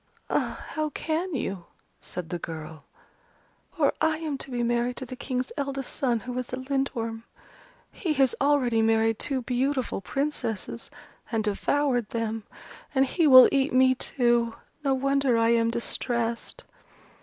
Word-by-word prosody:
"Ah, -, -, -1 dB
how 310 Hz, -1 st, -2 dB
can 320 Hz, +4 st, -2 dB
you?" 195 Hz, -8 st, -3 dB, 0.3 s
said 175 Hz, -2 st, -7 dB
the 175 Hz, -, -3 dB
girl, 155 Hz, -2 st, -8 dB, 0.9 s
"For 295 Hz, -5 st, +2 dB
I 315 Hz, 0 st, +2 dB
am 310 Hz, -3 st, -3 dB
to -, -, -5 dB
be 240 Hz, -2 st, -1 dB
married 240 Hz, +1 st, 0 dB
to 260 Hz, -, -5 dB
the 255 Hz, -, -7 dB
King's 255 Hz, -1 st, -3 dB
eldest 275 Hz, -2 st, -3 dB
son, 240 Hz, -4 st, 0 dB
who 245 Hz, 0 st, -6 dB
is 250 Hz, -, -6 dB
a -, -, -1 dB
Lindworm. 260 Hz, -4 st, -2 dB, 0.7 s
He 335 Hz, -6 st, -2 dB
has 270 Hz, -3 st, +3 dB
already 265 Hz, -5 st, +3 dB
married 225 Hz, 0 st, +2 dB
two 265 Hz, -3 st, -1 dB
beautiful 255 Hz, -2 st, -1 dB
Princesses, 235 Hz, -5 st, -3 dB, 0.4 s
and 225 Hz, -2 st, 0 dB
devoured 245 Hz, +3 st, 0 dB
them: 225 Hz, -1 st, -3 dB, 0.5 s
and 265 Hz, 0 st, +5 dB
he 320 Hz, +4 st, +2 dB
will 255 Hz, -2 st, +10 dB
eat 275 Hz, 0 st, +1 dB
me 260 Hz, 0 st, +5 dB
too! 240 Hz, -2 st, +1 dB, 0.3 s
No 275 Hz, -2 st, +2 dB
wonder 275 Hz, -2 st, +2 dB
I 230 Hz, 0 st, +3 dB
am 230 Hz, -1 st, +3 dB
distressed." 235 Hz, 0 st, -2 dB
250 Hz, 150 wpm, -26 LUFS, 230-275 Hz, 0.9 s, will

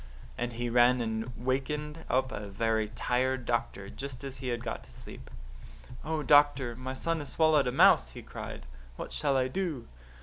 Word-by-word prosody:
"And 120 Hz, 0 st, -3 dB
he 120 Hz, +1 st, -3 dB
ran 120 Hz, +1 st, +4 dB
and 110 Hz, +1 st, -2 dB
wakened 150 Hz, +5 st, -2 dB
up 130 Hz, 0 st, +1 dB
a 105 Hz, -, -5 dB
very 110 Hz, +2 st, 0 dB
tired 130 Hz, 0 st, 0 dB
doctor 115 Hz, -4 st, -2 dB
just 135 Hz, +3 st, -7 dB
as 135 Hz, -1 st, -6 dB
he 130 Hz, 0 st, -6 dB
had 120 Hz, -1 st, -2 dB
got 115 Hz, -, -4 dB
to 65 Hz, -, -12 dB
sleep. -, -, -12 dB, 0.7 s
"'Oh, 155 Hz, -1 st, -2 dB
doctor, 145 Hz, -5 st, +4 dB
my 130 Hz, +2 st, -5 dB
son 165 Hz, +4 st, -1 dB
has 145 Hz, -, -6 dB
swallowed 155 Hz, -4 st, +3 dB
a -, -, +1 dB
mouse,' 130 Hz, -, +6 dB
he -, -, -10 dB
cried. -, -, -8 dB, 0.3 s
'What -, -, -7 dB
shall 140 Hz, -3 st, +1 dB
I 130 Hz, -1 st, +2 dB
do? 160 Hz, -4 st, -3 dB
130 Hz, 180 wpm, -30 LUFS, 120-145 Hz, 0.7 s, mouse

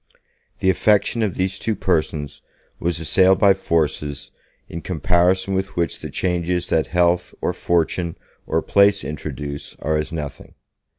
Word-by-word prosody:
The 95 Hz, -, +4 dB
affection 105 Hz, +4 st, +2 dB
of 105 Hz, -5 st, 0 dB
these 95 Hz, +1 st, -1 dB
two 110 Hz, -, -1 dB
persons 80 Hz, -6 st, -1 dB, 0.4 s
was 85 Hz, 0 st, -1 dB
assailed 95 Hz, +3 st, +4 dB
by 100 Hz, 0 st, +6 dB
forces 75 Hz, -5 st, -2 dB, 0.4 s
in 85 Hz, -, -6 dB
comparison 90 Hz, +3 st, +1 dB
with 95 Hz, +1 st, -2 dB
which 85 Hz, -3 st, -1 dB
the -, -, -7 dB
changes 90 Hz, -1 st, -1 dB
that 80 Hz, -, +1 dB
health 90 Hz, 0 st, +1 dB
or -, -, -1 dB
fortune 85 Hz, 0 st, 0 dB, 0.3 s
or -, -, 0 dB
place 100 Hz, 0 st, +4 dB
introduce 75 Hz, -1 st, -6 dB
are 75 Hz, +1 st, -1 dB
as 75 Hz, -, -3 dB
nothing. 75 Hz, -4 st, -7 dB
85 Hz, 140 wpm, -21 LUFS, 80-95 Hz, 0.4 s, by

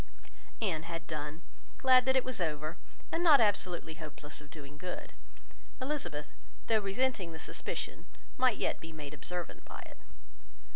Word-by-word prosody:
Anne 170 Hz, -7 st, +2 dB
had 165 Hz, 0 st, -5 dB
done; 155 Hz, +1 st, -4 dB, 0.3 s
glad 255 Hz, -1 st, +7 dB
that 260 Hz, -, +5 dB
it 260 Hz, -, +5 dB
was 255 Hz, -6 st, -1 dB
over, 155 Hz, 0 st, 0 dB, 0.4 s
and 335 Hz, -, +1 dB
not 305 Hz, -5 st, +9 dB
absolutely 185 Hz, -6 st, +2 dB
hopeless 150 Hz, -1 st, -5 dB
of 145 Hz, -, -13 dB
doing 145 Hz, -2 st, -9 dB
good. 180 Hz, +4 st, -5 dB, 0.7 s
Elizabeth, 255 Hz, -, -2 dB, 0.3 s
though 220 Hz, -1 st, +4 dB
resenting 200 Hz, -3 st, +1 dB
the -, -, -6 dB
suspicion, -, -, -3 dB, 0.3 s
might 255 Hz, -4 st, +4 dB
yet -, -, +1 dB
be 165 Hz, -, -8 dB
made 150 Hz, -2 st, -7 dB
observant 175 Hz, +4 st, -3 dB
by -, -, -8 dB
it. -, -, -13 dB
170 Hz, 150 wpm, -34 LUFS, 155-245 Hz, 0.7 s, not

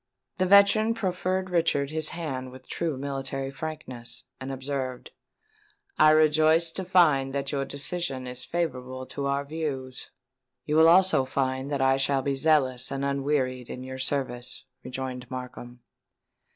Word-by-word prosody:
The 185 Hz, -, +2 dB
veteran 200 Hz, +3 st, +5 dB
proffered 185 Hz, -2 st, -1 dB
Richard 160 Hz, -5 st, +1 dB
his 155 Hz, -1 st, +2 dB
hand 135 Hz, -7 st, -4 dB
with 130 Hz, 0 st, -14 dB
true 165 Hz, -5 st, -2 dB
military 135 Hz, 0 st, -4 dB
frankness, 135 Hz, -6 st, -4 dB, 0.2 s
and 130 Hz, 0 st, -5 dB
observed, 130 Hz, -1 st, -4 dB, 0.9 s
"I 155 Hz, -, +8 dB
rejoice 155 Hz, +2 st, +4 dB
to 190 Hz, +2 st, -5 dB
find 150 Hz, -7 st, +3 dB
that 140 Hz, -1 st, -2 dB
your 140 Hz, -2 st, -1 dB
decision 140 Hz, -1 st, -4 dB
is 125 Hz, 0 st, -6 dB
favourable 130 Hz, -6 st, -3 dB
to 140 Hz, +1 st, -4 dB
our 140 Hz, +1 st, -1 dB
views." 140 Hz, -4 st, -5 dB, 0.6 s
"You 150 Hz, +1 st, +1 dB
will 160 Hz, +1 st, +7 dB
also 185 Hz, -5 st, +5 dB
find 130 Hz, 0 st, -2 dB
that 140 Hz, -2 st, -1 dB
I 135 Hz, 0 st, +4 dB
shall 135 Hz, 0 st, +1 dB
be 140 Hz, -, 0 dB
zealous 135 Hz, -3 st, +2 dB
and 140 Hz, 0 st, -2 dB
unwearied 135 Hz, -3 st, -1 dB
in 125 Hz, -, -6 dB
your 130 Hz, 0 st, -7 dB
service," 130 Hz, -1 st, -3 dB, 0.2 s
rejoined 125 Hz, -1 st, -5 dB
Markham. 125 Hz, -1 st, -8 dB
140 Hz, 145 wpm, -27 LUFS, 130-160 Hz, 0.9 s, I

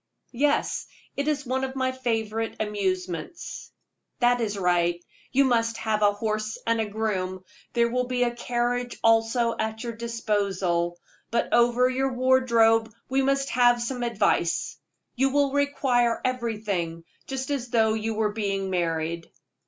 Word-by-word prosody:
"Yes; 285 Hz, +4 st, +1 dB, 0.3 s
it 280 Hz, +1 st, -2 dB
is 295 Hz, -2 st, 0 dB
one 260 Hz, +1 st, -1 dB
of 265 Hz, 0 st, -3 dB
my 260 Hz, -1 st, 0 dB
favorite 225 Hz, -3 st, -2 dB
amusements." 190 Hz, -, -3 dB, 0.5 s
"That 245 Hz, 0 st, +3 dB
is 210 Hz, -3 st, -1 dB
right; 175 Hz, -2 st, +1 dB, 0.3 s
you 275 Hz, +1 st, +4 dB
must 230 Hz, -2 st, +1 dB
have 215 Hz, -1 st, -1 dB
a 205 Hz, -1 st, +5 dB
horse 215 Hz, +1 st, -2 dB
and 225 Hz, -2 st, 0 dB
groom; 185 Hz, -4 st, -2 dB, 0.3 s
there 235 Hz, -1 st, +3 dB
will 250 Hz, +1 st, -1 dB
be 250 Hz, -1 st, +1 dB
a 240 Hz, -, +1 dB
carriage 245 Hz, 0 st, -1 dB
also 225 Hz, +1 st, +3 dB
at 220 Hz, +1 st, -2 dB
your 235 Hz, -1 st, -4 dB
disposal. 200 Hz, -7 st, -1 dB, 0.3 s
But 235 Hz, -, -1 dB
over 240 Hz, +1 st, +4 dB
your 265 Hz, +1 st, 0 dB
wardrobe 235 Hz, -3 st, +3 dB, 0.2 s
we 265 Hz, +1 st, +2 dB
must 275 Hz, 0 st, +1 dB
have 240 Hz, 0 st, +4 dB
some 245 Hz, +1 st, -3 dB
advice. 225 Hz, -7 st, +1 dB, 0.4 s
You 270 Hz, +2 st, +2 dB
will 280 Hz, 0 st, +2 dB
require 265 Hz, -4 st, +2 dB
everything, 210 Hz, -9 st, -2 dB, 0.2 s
just 265 Hz, +1 st, -4 dB
as 265 Hz, -4 st, -2 dB
though 220 Hz, -2 st, +3 dB
you 220 Hz, 0 st, -2 dB
were 210 Hz, -1 st, 0 dB
being 195 Hz, -3 st, -2 dB
married." 165 Hz, -1 st, -1 dB
230 Hz, 145 wpm, -26 LUFS, 210-250 Hz, 0.5 s, a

